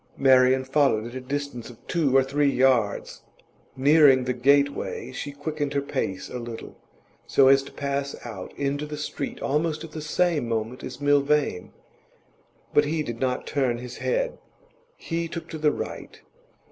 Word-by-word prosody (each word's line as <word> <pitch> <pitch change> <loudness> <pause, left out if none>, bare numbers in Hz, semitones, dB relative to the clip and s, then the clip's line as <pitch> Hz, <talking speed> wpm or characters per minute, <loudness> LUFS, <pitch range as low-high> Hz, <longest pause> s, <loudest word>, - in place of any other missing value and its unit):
Marian 130 -1 +5
followed 135 -5 +2
at - - -13
a 130 - -5
distance 140 -2 -4
of 120 - -12
two 145 -6 +2
or 135 - +5
three 140 +2 +1
yards. 130 -1 +1 0.6
Nearing 140 -1 +6
the 125 0 -1
gateway, 140 0 +1
she 145 +2 -5
quickened 145 0 -3
her 140 - +2
pace 95 -8 -3
a 125 - -6
little, 115 -1 -8 0.5
so 135 -1 +5
as 135 0 +6
to 135 - -11
pass 140 0 -3
out 105 -6 -7
into 145 +1 -2
the 150 0 -6
street 145 -1 -5
almost 155 +2 0
at 165 - -9
the 155 - -6
same 155 -4 0
moment 115 +2 -3
as - - -7
Milvain. 145 -7 +2 1.0
But 145 - +5
he 155 +1 -1
did 120 -4 -6
not 130 -1 -1
turn 130 -5 0
his 125 0 -8
head. - - -1 0.6
He 165 0 -3
took 170 0 -7
to 160 - -6
the 150 -1 +3
right. - - -6
140 Hz, 165 wpm, -25 LUFS, 130-150 Hz, 1.0 s, Nearing